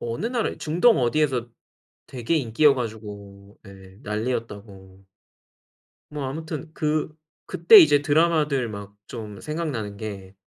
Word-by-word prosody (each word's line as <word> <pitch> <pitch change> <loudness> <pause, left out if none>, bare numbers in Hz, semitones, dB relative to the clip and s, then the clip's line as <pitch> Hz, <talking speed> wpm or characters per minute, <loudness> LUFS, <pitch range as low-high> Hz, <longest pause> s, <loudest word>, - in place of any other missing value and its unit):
어느 120 - -4
나라 235 -2 -1
중동 180 +10 +2
어디에서 125 -1 0 0.6
되게 125 +5 -3
인기여 140 +2 +3
가지고 105 -4 -8
예 95 -1 -14
난리였다고. 105 -4 -6 1.1
뭐 145 -2 -5
아무튼 155 +2 -6
그 155 0 -1 0.3
그때 175 +6 +7
이제 145 -2 +6
드라마들 150 -5 +1
막 100 -1 -9
좀 105 -4 -8
생각나는 145 -11 -4
게 100 -3 -8
120 Hz, 250 characters per minute, -24 LUFS, 105-155 Hz, 1.1 s, 그때